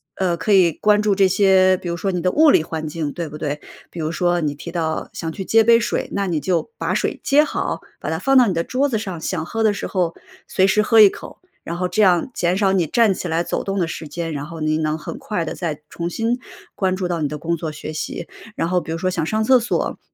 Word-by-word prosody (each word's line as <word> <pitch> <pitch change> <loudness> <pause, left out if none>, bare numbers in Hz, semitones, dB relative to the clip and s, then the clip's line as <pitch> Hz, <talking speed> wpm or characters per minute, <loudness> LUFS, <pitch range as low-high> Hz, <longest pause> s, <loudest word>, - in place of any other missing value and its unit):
呃， 180 -2 0
可 210 +5 -2
以 180 -4 +5
关 210 +6 +2
注 210 - +3
这 195 -1 +4
些 185 -1 +4
比 180 - -8
如 170 - -2
说 195 +3 -1
你 180 - -2
的 180 +1 +1
物 310 0 +5
理 160 - +5
环 160 -1 -5
境， 150 -2 -4
对 170 -3 -5
不 150 - -8
对？ 150 -1 -3 0.3
比 170 - -8
如 155 0 -2
说 175 0 +1
你 145 -2 -1
提 170 +3 -8
到 160 -2 -2
想 165 -1 -4
去 190 +2 -6
接 225 0 +4
杯 230 +1 +6
水， 230 - -2
那 200 0 0
你 165 -4 -1
就 185 - -1
把 - - -1
水 - - -1
接 295 +2 +4
好， - - -3 0.2
把 - - -4
它 - - -1
放 270 0 +1
到 250 -2 +7
你 190 - 0
的 165 - 0
桌 275 +7 0
子 225 - 0
上， 190 -6 -5
想 165 -4 -3
喝 225 +5 -3
的 220 -1 +4
时 205 - -4
候 175 -3 -1 0.3
随 190 - +2
时 210 +2 +3
喝 225 +1 +4
一 210 - +10
口， - - -11 0.2
然 170 +1 -5
后 180 0 0
这 180 +4 0
样 180 +2 +3
减 180 +1 0
少 195 -2 +2
你 175 -5 +1
站 225 0 +3
起 180 - -5
来 165 +1 0
走 - - -3
动 195 0 -3
的 170 - +1
时 160 -1 -6
间， 165 +1 -4
然 145 0 -4
后 165 0 -9
你 155 0 +1
能 155 0 -1
很 155 - -7
快 175 -6 -3
地 - - -4
再 160 -4 -4
重 170 0 -4
新 230 +6 -1 0.4
关 185 -1 0
注 185 -2 -2
到 170 -2 -2
你 145 - +1
的 150 +1 -5
工 170 +3 -1
作 155 -1 -4
学 155 +1 -7
习。 150 - -5 0.3
然 - - -1
后 180 -1 +1
比 - - -7
如 165 - -2
说 185 +2 -1
想 165 -3 -1
上 220 +4 0
厕 255 +2 +5
所， 235 - -2
180 Hz, 295 characters per minute, -21 LUFS, 165-205 Hz, 0.4 s, 一